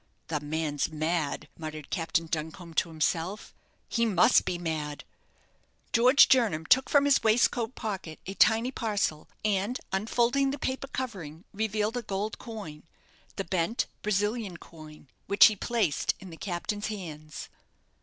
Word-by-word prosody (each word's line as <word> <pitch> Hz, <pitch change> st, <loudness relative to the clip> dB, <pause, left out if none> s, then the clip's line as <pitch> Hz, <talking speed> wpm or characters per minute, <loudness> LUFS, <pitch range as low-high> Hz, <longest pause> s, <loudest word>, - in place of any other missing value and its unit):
"The 155 Hz, -2 st, 0 dB
man's 150 Hz, 0 st, -2 dB
mad," 155 Hz, -1 st, -1 dB
muttered 155 Hz, -2 st, -7 dB
Captain 165 Hz, 0 st, 0 dB
Duncombe 160 Hz, +2 st, -5 dB
to 165 Hz, -, +1 dB
himself; 165 Hz, +5 st, -2 dB, 0.3 s
"he 230 Hz, -, 0 dB
must 215 Hz, +1 st, +4 dB
be 175 Hz, -, -1 dB
mad!" 155 Hz, -4 st, -4 dB, 0.9 s
George 250 Hz, +4 st, +7 dB
Jernam 210 Hz, -12 st, +3 dB
took 260 Hz, +9 st, +4 dB
from 285 Hz, -1 st, +4 dB
his 285 Hz, -1 st, +4 dB
waistcoat 230 Hz, +1 st, +2 dB
pocket 195 Hz, -8 st, -5 dB
a 195 Hz, -, -5 dB
tiny 225 Hz, +4 st, +4 dB
parcel, 205 Hz, -, -1 dB, 0.2 s
and 205 Hz, +4 st, 0 dB
unfolding 240 Hz, +7 st, +2 dB
the 280 Hz, -, -3 dB
paper 265 Hz, 0 st, -3 dB
covering, 190 Hz, -, -5 dB
revealed 215 Hz, +2 st, -1 dB
a -, -, -1 dB
gold 210 Hz, 0 st, -3 dB
coin 205 Hz, -11 st, -8 dB, 0.5 s
the 195 Hz, -, -2 dB
bent 185 Hz, +4 st, 0 dB, 0.2 s
Brazilian 210 Hz, -1 st, -1 dB
coin 155 Hz, -3 st, -13 dB, 0.2 s
which 200 Hz, -, +8 dB
he 215 Hz, -, +5 dB
placed 210 Hz, -, 0 dB
in 190 Hz, -2 st, -10 dB
the -, -, -8 dB
captain's 205 Hz, +3 st, -3 dB
hands. 155 Hz, -8 st, -7 dB
195 Hz, 140 wpm, -28 LUFS, 160-225 Hz, 0.9 s, which